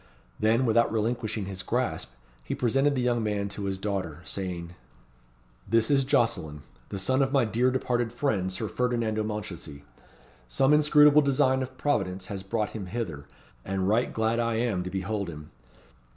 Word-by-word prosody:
Then, 115 Hz, +4 st, +3 dB
without 115 Hz, 0 st, +3 dB
relinquishing 110 Hz, -1 st, -1 dB
his 95 Hz, -1 st, -5 dB
grasp, 90 Hz, -, -2 dB, 0.3 s
he -, -, -3 dB
presented 135 Hz, +4 st, +2 dB
the 125 Hz, -, 0 dB
young 120 Hz, -1 st, +1 dB
man 105 Hz, -2 st, -1 dB
to 100 Hz, 0 st, -5 dB
his 95 Hz, -1 st, -2 dB
daughter, 95 Hz, -5 st, -3 dB
saying 90 Hz, -3 st, -5 dB, 1.0 s
"This 115 Hz, +2 st, +3 dB
is 135 Hz, -1 st, +4 dB
Jocelyn, 80 Hz, -, 0 dB, 0.3 s
the 100 Hz, -, -4 dB
son 130 Hz, +8 st, +1 dB
of 135 Hz, -1 st, +1 dB
my 135 Hz, -4 st, +3 dB
dear 120 Hz, +4 st, +2 dB
departed 120 Hz, -2 st, 0 dB
friend, 110 Hz, -8 st, -1 dB
Sir 110 Hz, +4 st, -3 dB
Ferdinando 115 Hz, -3 st, 0 dB
Mounchensey. 90 Hz, -9 st, -6 dB, 0.6 s
Some 135 Hz, -, +3 dB
inscrutable 150 Hz, 0 st, +6 dB
design 135 Hz, -2 st, +2 dB
of 130 Hz, 0 st, -6 dB
Providence 95 Hz, -10 st, -1 dB
has 95 Hz, -, -5 dB
brought 105 Hz, +2 st, -2 dB
him 100 Hz, -4 st, -6 dB
hither, 90 Hz, -10 st, -5 dB, 0.4 s
and 95 Hz, -1 st, -1 dB
right 115 Hz, +4 st, +2 dB
glad 110 Hz, +1 st, 0 dB
I 115 Hz, -1 st, 0 dB
am 110 Hz, -5 st, 0 dB
to -, -, -3 dB
behold 95 Hz, +1 st, -3 dB
him. 75 Hz, -2 st, -10 dB
110 Hz, 165 wpm, -27 LUFS, 95-125 Hz, 1.0 s, inscrutable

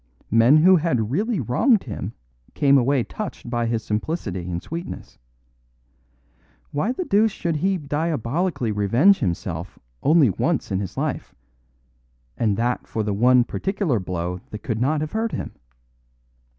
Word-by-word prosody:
Men 115 Hz, +7 st, +6 dB
who 185 Hz, +4 st, +6 dB
had 125 Hz, -9 st, 0 dB
really 210 Hz, -, 0 dB
wronged 165 Hz, -, +2 dB
him 105 Hz, -2 st, -6 dB, 0.4 s
came 140 Hz, -2 st, +4 dB
away 135 Hz, 0 st, +3 dB
touched 200 Hz, -, -7 dB
by 120 Hz, -1 st, 0 dB
his 115 Hz, -1 st, -1 dB
simplicity 105 Hz, -, -3 dB
and 85 Hz, -1 st, -2 dB
sweetness. 170 Hz, -, -8 dB, 1.5 s
Why 170 Hz, +11 st, 0 dB
the 360 Hz, +8 st, -3 dB
deuce 215 Hz, -1 st, +3 dB
should 170 Hz, -4 st, -2 dB
he 190 Hz, +5 st, +1 dB
diabolically 150 Hz, -2 st, -1 dB
revenge 115 Hz, -, +4 dB
himself 90 Hz, -, -3 dB, 0.2 s
only 150 Hz, -6 st, +4 dB
once -, -, -1 dB
in 95 Hz, -, 0 dB
his 100 Hz, -3 st, -6 dB
life; -, -, -3 dB, 1.0 s
and 105 Hz, -3 st, 0 dB
that 120 Hz, +2 st, -1 dB
for 110 Hz, -, -2 dB
the 105 Hz, -1 st, -1 dB
one 125 Hz, +4 st, +5 dB
particular 190 Hz, -, -1 dB
blow 90 Hz, -1 st, -4 dB
that 105 Hz, -, -8 dB
could 115 Hz, -2 st, -2 dB
not 150 Hz, +4 st, +1 dB
have 155 Hz, 0 st, -3 dB
hurt 225 Hz, 0 st, -2 dB
him? -, -, -4 dB
125 Hz, 145 wpm, -23 LUFS, 105-170 Hz, 1.5 s, Men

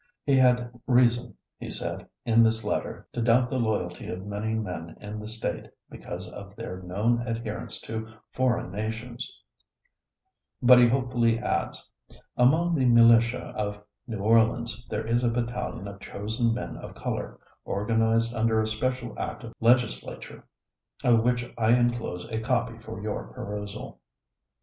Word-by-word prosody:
He 140 Hz, -, +3 dB
had 125 Hz, -2 st, +4 dB, 0.2 s
reason, 120 Hz, -1 st, +3 dB, 0.2 s
he -, -, -6 dB
said -, -, -4 dB, 0.2 s
in 115 Hz, 0 st, +5 dB
this 110 Hz, -1 st, +3 dB
letter, -, -, -3 dB
to 120 Hz, -, -2 dB
doubt 120 Hz, +2 st, +3 dB
the 130 Hz, -, 0 dB
loyalty 105 Hz, -6 st, -1 dB
of 90 Hz, +2 st, -5 dB
many 105 Hz, +2 st, -2 dB
men 90 Hz, -6 st, -5 dB
in 105 Hz, +1 st, -6 dB
the 105 Hz, -, -7 dB
state, 110 Hz, +1 st, -4 dB, 0.2 s
because 90 Hz, +1 st, -7 dB
of 100 Hz, 0 st, -10 dB
their 95 Hz, -5 st, -6 dB
known 105 Hz, +7 st, +1 dB
adherence 115 Hz, -2 st, -3 dB
to 110 Hz, 0 st, -5 dB, 0.2 s
foreign 130 Hz, -2 st, 0 dB
nations, 110 Hz, +4 st, -4 dB, 1.3 s
but 125 Hz, 0 st, +8 dB
he 120 Hz, -, +7 dB
hopefully 120 Hz, -3 st, +2 dB
adds, 120 Hz, -, -2 dB, 0.5 s
"Among 160 Hz, +8 st, +4 dB
the 135 Hz, -5 st, +2 dB
militia 115 Hz, 0 st, +5 dB
of 105 Hz, -1 st, -2 dB, 0.3 s
New 115 Hz, -3 st, -4 dB
Orleans 115 Hz, +2 st, +2 dB
there 105 Hz, -, -2 dB
is 120 Hz, +2 st, +1 dB
a 120 Hz, -, +3 dB
battalion 120 Hz, -3 st, -3 dB
of 100 Hz, 0 st, -8 dB
chosen 110 Hz, +4 st, -1 dB
men 120 Hz, +2 st, -4 dB
of -, -, -9 dB
color, -, -, -4 dB, 0.2 s
organized 115 Hz, +3 st, +1 dB
under 110 Hz, -1 st, +2 dB
a 110 Hz, -, +2 dB
special 120 Hz, +2 st, -2 dB
act -, -, -4 dB
of 115 Hz, -, -8 dB
Legislature, 120 Hz, -1 st, +1 dB, 0.6 s
of 120 Hz, -2 st, +5 dB
which 120 Hz, 0 st, +1 dB
I 115 Hz, +2 st, +5 dB
inclose 120 Hz, -7 st, -1 dB
a 110 Hz, -, -1 dB
copy 115 Hz, -1 st, -1 dB
for 110 Hz, -3 st, -8 dB
your 105 Hz, -1 st, -3 dB
perusal." 105 Hz, 0 st, -6 dB
115 Hz, 150 wpm, -27 LUFS, 110-120 Hz, 1.3 s, but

